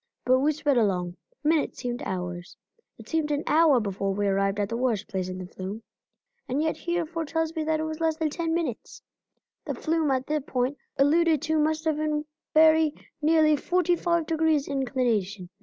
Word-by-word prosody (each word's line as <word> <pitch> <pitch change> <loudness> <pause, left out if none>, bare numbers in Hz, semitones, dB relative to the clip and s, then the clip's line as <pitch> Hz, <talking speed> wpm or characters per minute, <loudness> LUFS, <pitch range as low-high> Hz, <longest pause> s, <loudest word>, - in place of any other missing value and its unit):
But 255 +1 +4
we 290 +3 +3
sped 290 -3 +1
along; 180 -5 0 0.3
minutes 310 0 +1
seemed 245 -1 -4
hours. 180 -1 -5 0.4
It - - -13
seemed 320 -2 0
an 290 0 -1
hour 305 -4 +5
before 195 -2 -2
we 205 0 0
arrived 195 +1 +1
at 205 - 0
the 230 - -3
worst 235 -4 0
place 190 -3 -3
in 185 - -5
the 185 - -6
flume, 190 +4 -7 0.7
and 260 +3 0
yet 315 0 0
Hereford 335 -2 -3
tells 325 +1 -1
me 320 - -1
that 315 0 +1
it - - -1
was 315 0 -4
less 320 -1 +1
than 315 -2 -1
ten 330 +1 -2
minutes. 325 -9 -3 0.6
The - - -3
flume 320 -2 0
at 260 -1 0
the 305 +1 -1
point 260 +1 -2 0.2
alluded 315 +2 +3
to 315 0 +1
must 310 +1 0
have 315 -2 +1
been 305 -1 -1 0.3
very 315 -1 +5 0.3
nearly 310 0 +4
forty 355 +4 +1
five 340 -1 0
degrees 315 -2 +1
inclination. 240 -9 -1
295 Hz, 190 wpm, -26 LUFS, 225-320 Hz, 0.7 s, hour